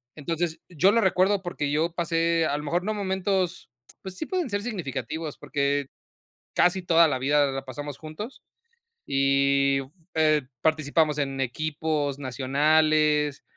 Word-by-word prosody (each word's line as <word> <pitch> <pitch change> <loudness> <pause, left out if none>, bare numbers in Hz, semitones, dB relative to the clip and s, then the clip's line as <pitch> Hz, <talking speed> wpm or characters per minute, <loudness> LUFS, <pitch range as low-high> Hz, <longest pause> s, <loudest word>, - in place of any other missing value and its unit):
Entonces, 165 +2 -3
yo 180 +3 +3
lo 230 - +3
recuerdo 190 0 +2
porque 150 -5 -3
yo 160 +3 0
pasé 165 -1 +1
a 145 - 0
lo 150 - -6
mejor 175 +4 0
no 215 +2 -1
momentos, 190 -4 -1 0.3
pues 190 0 -7
sí, - - -3
pueden 355 -5 -2
ser 205 0 -1
significativos, 160 - -4
porque 140 -1 -1 0.7
casi 180 +1 +3
toda 170 -1 +5
la 145 - 0
vida 145 +2 +3
la 135 0 -5
pasamos 145 +2 -6
juntos. 160 - -8 0.6
Y, 140 0 +2 0.4
eh, 155 -1 +3 0.2
participamos 155 -1 +2
en 135 -1 -2
equipos 145 +1 -2
nacionales, 150 +3 +2
155 Hz, 135 wpm, -26 LUFS, 140-175 Hz, 0.7 s, toda